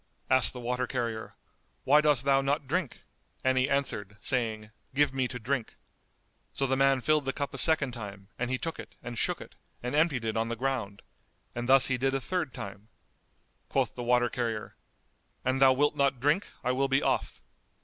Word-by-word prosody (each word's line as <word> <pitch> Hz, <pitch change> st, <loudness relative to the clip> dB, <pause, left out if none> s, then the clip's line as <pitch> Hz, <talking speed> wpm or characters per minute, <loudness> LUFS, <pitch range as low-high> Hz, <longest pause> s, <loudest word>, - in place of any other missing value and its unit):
Asked 130 Hz, -1 st, +4 dB
the 125 Hz, -, -7 dB
water 125 Hz, +1 st, -1 dB
carrier, 115 Hz, -3 st, -3 dB, 0.5 s
"Why 150 Hz, +3 st, +6 dB
dost 145 Hz, -4 st, +2 dB
thou 135 Hz, -1 st, +4 dB
not 140 Hz, +1 st, 0 dB
drink?"; 160 Hz, 0 st, -2 dB, 0.4 s
and 130 Hz, 0 st, +3 dB
he 130 Hz, +2 st, +2 dB
answered, 105 Hz, -8 st, -1 dB
saying, 110 Hz, -3 st, -1 dB, 0.2 s
"Give 145 Hz, -1 st, +3 dB
me 130 Hz, -1 st, 0 dB
to 125 Hz, -, -6 dB
drink." 125 Hz, 0 st, -2 dB, 0.8 s
So 135 Hz, -, 0 dB
the 135 Hz, 0 st, +1 dB
man 135 Hz, -1 st, +3 dB
filled 155 Hz, +1 st, +2 dB
the 135 Hz, -, -1 dB
cup 140 Hz, -1 st, -3 dB
a 135 Hz, -, -4 dB
second 155 Hz, -5 st, +2 dB
time 100 Hz, -4 st, -8 dB
and 120 Hz, 0 st, -1 dB
he 130 Hz, -, 0 dB
took 165 Hz, +5 st, -4 dB
it -, -, -10 dB
and 120 Hz, 0 st, -6 dB
shook -, -, 0 dB
it -, -, -11 dB, 0.3 s
and 125 Hz, -, -3 dB
emptied 150 Hz, -6 st, +2 dB
it 110 Hz, 0 st, -1 dB
on 115 Hz, 0 st, 0 dB
the 115 Hz, -, -2 dB
ground; 115 Hz, -6 st, -3 dB, 0.5 s
and 120 Hz, +1 st, -4 dB
thus 135 Hz, 0 st, +7 dB
he 125 Hz, -2 st, 0 dB
did 135 Hz, +1 st, +1 dB
a -, -, +1 dB
third 170 Hz, 0 st, -2 dB
time. 100 Hz, -1 st, -8 dB, 0.8 s
Quoth -, -, +1 dB
the 125 Hz, -, -6 dB
water 120 Hz, 0 st, +3 dB
carrier, 115 Hz, -4 st, -3 dB, 0.7 s
"An 130 Hz, +1 st, +1 dB
thou 135 Hz, -1 st, +7 dB
wilt 145 Hz, +3 st, +2 dB
not 140 Hz, -2 st, +2 dB
drink, 150 Hz, +9 st, +2 dB, 0.2 s
I 125 Hz, -, +1 dB
will 135 Hz, +2 st, +1 dB
be 135 Hz, +1 st, +2 dB
off." -, -, 0 dB
130 Hz, 200 wpm, -29 LUFS, 120-140 Hz, 0.8 s, thus